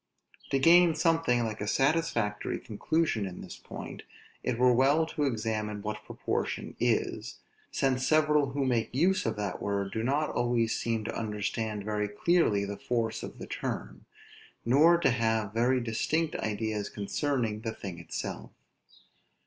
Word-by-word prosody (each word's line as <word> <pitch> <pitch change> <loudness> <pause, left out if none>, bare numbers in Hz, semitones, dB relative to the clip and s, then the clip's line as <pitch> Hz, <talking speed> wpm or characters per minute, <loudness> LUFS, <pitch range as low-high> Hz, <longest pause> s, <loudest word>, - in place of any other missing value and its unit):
To 135 - +2
gain 170 +3 +6
something 165 -7 +2
like 110 -2 -4
a 105 - -2
satisfactory 135 -6 +1
conclusion 115 -1 -1
in 90 - -8
this - - -8
point, - - -8 0.4
it 125 -2 -1
were 125 0 +5
well 140 +6 +4
to 155 -2 -2
examine 110 -4 -2
what 105 0 -4
proportion - - -3
is; - - 0 0.3
since 130 -1 +1
several 150 -2 +3
who 140 -1 0
make 120 -2 0
use 180 +4 +2
of 110 - -1
that 100 -3 -3
word 100 -1 -1
do 110 - -2
not 140 +6 0
always 120 -2 +1
seem 115 -2 -1
to - - -4
understand 105 0 -2
very 105 -1 -1
clearly 105 - +2
the 100 0 -5
force 115 -2 -1
of - - -8
the - - -7
term, 65 +1 -5 0.6
nor 150 +8 +6
to 170 - +3
have 110 -3 0
very 125 +3 +2
distinct 150 +8 -1
ideas 110 -1 -2
concerning 110 0 -1
the 115 -1 -3
thing 95 -5 -7
itself. 85 - -5
115 Hz, 150 wpm, -29 LUFS, 105-140 Hz, 0.6 s, gain